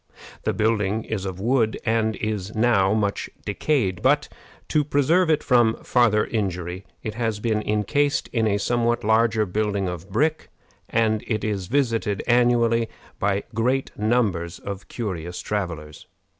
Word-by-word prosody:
The - - +1
building 110 -1 +1
is 100 -3 -4
of 95 -1 -5
wood, 115 +1 +1
and 110 -1 +1
is 105 -1 -3
now 110 -3 +3
much 100 -2 -1 0.2
decayed; 105 -12 0
but, - - +2 0.4
to 150 - +2
preserve 155 +5 +2
it 155 -1 +2
from 120 -3 +4
farther 115 -4 +3
injury, 90 -3 -3 0.2
it 110 - -3
has 110 -2 -2
been 110 -1 0
incased 125 +8 0
in 115 -3 +1
a 100 -1 +2
somewhat 120 +2 0
larger 110 0 +3
building 100 0 -1
of 90 +1 -6
brick, 155 +10 0 0.4
and 110 -2 +1
it 110 -3 -1
is 100 -4 -2
visited 115 -6 0
annually 120 -1 +3 0.3
by 100 0 0
great 125 +4 0
numbers 105 -7 0
of 100 -1 -7
curious 90 -7 -5
travelers. 85 -7 -4
110 Hz, 145 wpm, -23 LUFS, 100-120 Hz, 0.4 s, from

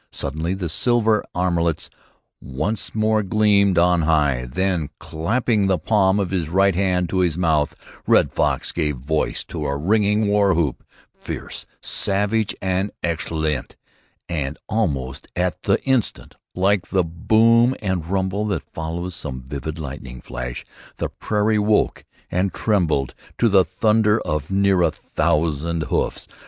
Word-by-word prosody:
Suddenly 80 +6 -3
the 95 -3 -3
silver 110 +5 +2
armlets 85 -3 0 0.5
once 95 - -3
more 110 0 +2
gleamed 100 -2 +3
on 90 0 +4
high. 75 -6 +2
Then, 90 0 0
clapping 105 +5 0
the 95 -1 +2
palm 95 +3 +2
of 95 -3 -1
his 85 -5 -1
right 95 +3 +3
hand 90 -1 +1
to 95 - 0
his 85 -3 +1
mouth, 80 -4 +1 0.3
Red - - +4
Fox - - 0
gave 75 -4 -1
voice 75 +5 -1
to 75 - -6
a 70 0 -1
ringing 105 +5 +2
war 100 -3 +3
whoop, 80 -6 -1 0.4
fierce, - - -6 0.2
savage 105 +2 0
and 95 +2 0
exultant, 80 -3 -2 0.5
and, 75 -4 -3
almost 70 - -2
at 90 -2 -1
the - - +2
instant, 130 -5 -1 0.2
like 95 0 +2
the 95 -2 +1
boom 115 +8 +3
and 95 -5 -2
rumble 95 +3 -1
that 100 - -2
follows 85 +3 -4
some 65 -5 -5
vivid 70 +4 -5
lightning 65 -4 -7
flash, - - -6 0.3
the - - -2
prairie 105 0 0
woke 105 +1 +1 0.3
and 90 0 0
trembled 80 - +1 0.2
to 120 - +3
the 95 -3 +5
thunder 110 +4 +2
of 75 -1 -3
near 95 -1 +3
a 85 - +4
thousand 80 +1 -1
hoofs. - - -2
90 Hz, 140 wpm, -22 LUFS, 80-105 Hz, 0.5 s, the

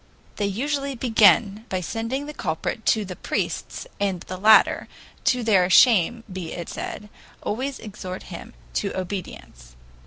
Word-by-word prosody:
They 205 - 0
usually 275 +6 -2
begin 220 -3 +4
by 185 -1 -1
sending 230 - -3
the 300 - -7
culprit 180 - -3
to 215 -2 +3
the 180 -1 -7
priests, - - -3
and 195 -4 -1
the 185 - -7
latter, 215 +3 +5 0.4
to 250 -1 +2
their 190 -5 +4
shame 230 +2 +5
be 180 -3 -5
it 170 -2 -6
said, 210 - -6 0.4
always 265 +5 -2
exhort 190 -3 -7
him - - -9 0.2
to - - -2
obedience. 170 - -7
205 Hz, 145 wpm, -24 LUFS, 185-235 Hz, 0.4 s, latter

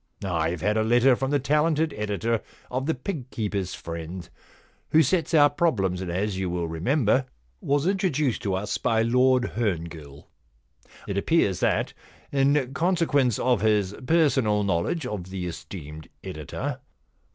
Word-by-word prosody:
Fve 85 -3 -1
had 105 +4 +1
a 110 - +2
letter 120 +3 +4
from 135 +2 -2
the 145 - +3
talented 150 +3 +1
editor 105 +2 -1 0.3
of 130 +2 -2
The 160 - +1
Pig 135 -1 -5
Keeper's 100 -6 -3
Friend^ 85 +1 -7 0.6
who 160 +1 +5
sets 165 +5 0
our 145 -2 +7
problems, 110 - 0
and, 90 - -4
as 95 +2 -1
you 95 -1 -1
will 85 -1 -2
remember, 125 - +1 0.3
was 145 +1 +1
introduced 175 - +1
to 100 -2 -1
us 100 +2 -2
by 110 0 +2
Lord 125 +2 +3
Herngill. 85 -9 -3 0.8
It 100 0 -1
appears 100 - +2
that, - - +1 0.4
in 135 -1 +2
consequence 155 - +2
of 125 -6 +1
his 105 -3 +2
personal 135 -11 +3
knowledge 100 - 0
of 105 -7 -4
the 95 -1 -4
esteemed 80 -3 -8
editor. - - -5
115 Hz, 145 wpm, -25 LUFS, 95-140 Hz, 0.8 s, our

